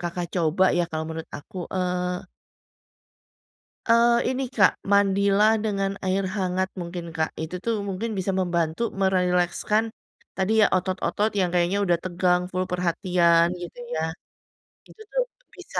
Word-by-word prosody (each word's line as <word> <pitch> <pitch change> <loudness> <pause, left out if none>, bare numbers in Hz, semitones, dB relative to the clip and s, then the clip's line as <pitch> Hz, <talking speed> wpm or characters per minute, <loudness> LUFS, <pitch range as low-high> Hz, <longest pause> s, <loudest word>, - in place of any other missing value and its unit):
Kakak 175 0 -3
coba 175 +2 +2
ya - - +3
kalau 160 0 -3
menurut 160 0 -6
aku, 185 +8 -13 0.2
eee 180 0 -1 1.6
eee, 235 +1 +5 0.2
ini, 270 - -1
Kak, 220 -6 +4 0.2
mandilah 200 +2 +4
dengan 195 -2 -1
air 190 +1 +1
hangat 185 -1 0
mungkin, 175 -1 -5
Kak. 160 0 0
Itu 160 +3 -4
tuh 230 -1 0
mungkin 210 +4 -3
bisa 190 +1 -1
membantu 175 +3 0
merilekskan 185 +2 +1 0.5
tadi 190 +2 0
ya, - - +6
otot-otot 190 +3 0
yang 180 - +3
kayaknya 180 +3 +2
udah 175 -2 +3
tegang, 180 0 +1
full 185 0 -1
perhatian 170 -1 +3
gitu 175 +6 -9 0.2
ya. 160 - -1 0.9
Gitu 440 - -16
tuh - - +1 0.3
bisa - - -5
185 Hz, 135 wpm, -25 LUFS, 175-200 Hz, 1.6 s, ya